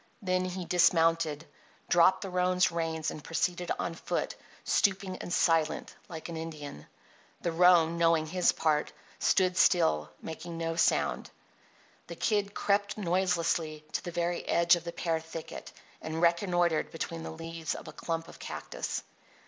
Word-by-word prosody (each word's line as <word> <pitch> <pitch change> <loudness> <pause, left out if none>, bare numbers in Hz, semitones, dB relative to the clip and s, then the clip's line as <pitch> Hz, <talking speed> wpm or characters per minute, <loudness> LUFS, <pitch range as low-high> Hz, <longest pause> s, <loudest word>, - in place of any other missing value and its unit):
Then 185 -3 0
he 185 0 -4
dismounted, 165 -3 +3 0.4
dropped 185 +2 +5
the 195 - -5
roan's 180 0 +2
reins, 160 -1 -2
and 150 - -9
proceeded 175 +1 -1
on 170 - -2
foot, 165 - -3 0.3
stooping 190 -2 +1
and - - -7
silent, 165 -3 +1
like 160 -3 -7
an 170 - -6
Indian. 155 - -7 0.5
The 170 - -1
roan, 170 -1 +5
knowing 165 -2 +3
his 180 +3 +2
part, 150 -2 0 0.3
stood 185 -1 +3
still, 75 - +3
making 165 +1 -7
no 165 0 -2
sound. 70 - +1 0.8
The 170 - -7
Kid 205 +2 0
crept 205 +1 +1
noiselessly 170 -4 0
to - - -2
the - - -5
very 175 0 -1
edge 170 +1 +5
of 170 0 -7
the 170 - -3
pear 165 -2 -1
thicket 160 0 -8 0.3
and 160 +1 -4
reconnoitred 170 -1 +2
between 165 0 -5
the - - -6
leaves 165 0 -5
of - - -9
a - - -8
clump 165 -1 -3
of - - -13
cactus. - - -5
170 Hz, 150 wpm, -30 LUFS, 160-180 Hz, 0.8 s, dropped